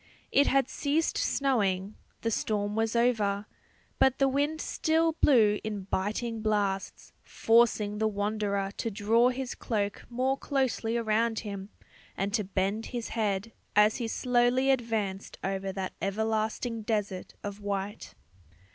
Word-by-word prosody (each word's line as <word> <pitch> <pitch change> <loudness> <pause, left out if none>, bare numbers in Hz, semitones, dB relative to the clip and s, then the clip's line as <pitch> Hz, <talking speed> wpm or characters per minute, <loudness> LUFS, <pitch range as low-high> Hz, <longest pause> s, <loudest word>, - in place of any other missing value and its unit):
It 285 - +4
had 270 -1 +3
ceased 305 +4 0
snowing; 205 -8 +1 0.3
the 230 - -1
storm 210 -1 -1
was 225 +1 0
over; 215 -4 +2 0.5
but 265 -1 +4
the 275 - +3
wind 290 +4 0
still 325 0 +1
blew 225 -9 +4
in 210 -3 -4
biting 215 +4 -2
blasts, 205 -3 -1
forcing 225 -2 +2
the 220 - +2
wanderer 205 -1 -1
to 230 - -1
draw 225 +4 +3
his 255 0 -3
cloak 205 -3 -3
more 260 +3 0
closely 255 -4 0
around 225 0 +1
him, 200 -2 -6 0.5
and 200 +1 -1
to 220 -2 +1
bend 195 +3 -1
his 240 -2 -4
head, 210 -1 -1 0.2
as 210 +1 +5
he 235 - -2
slowly 250 +3 +2
advanced 220 -6 -2
over 195 0 -2
that 190 -1 -4
everlasting 220 +3 -1
desert 210 -4 -3
of 205 0 -5
white. 200 0 -4
220 Hz, 135 wpm, -29 LUFS, 205-240 Hz, 0.5 s, as